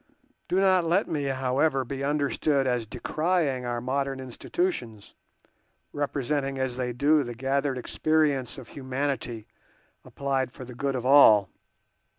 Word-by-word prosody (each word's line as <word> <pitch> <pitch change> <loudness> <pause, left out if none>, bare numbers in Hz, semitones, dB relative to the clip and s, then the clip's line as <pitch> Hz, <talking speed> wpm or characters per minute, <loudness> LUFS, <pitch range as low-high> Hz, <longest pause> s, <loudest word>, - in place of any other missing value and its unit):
Do 185 - +1
not 190 -2 +4
let 175 +5 +1
me, 145 -3 -2
however, 135 +1 +1
be 135 +2 -5
understood 145 -1 +1
as 125 -3 0
decrying 145 - -1
our 120 0 -2
modern 135 +2 -2
institutions, 125 - -3 0.8
representing 140 -1 -2
as 130 -2 -2
they 125 -1 -2
do 145 +5 +3
the 120 -3 -5
gathered 135 +2 -1
experience 145 0 0
of 130 -3 -10
humanity 130 -4 -3 0.6
applied 135 -2 -2
for 130 - -10
the 125 - -10
good 135 +2 -2
of 125 -1 -3
all. 110 -8 +7
135 Hz, 135 wpm, -26 LUFS, 125-145 Hz, 0.8 s, all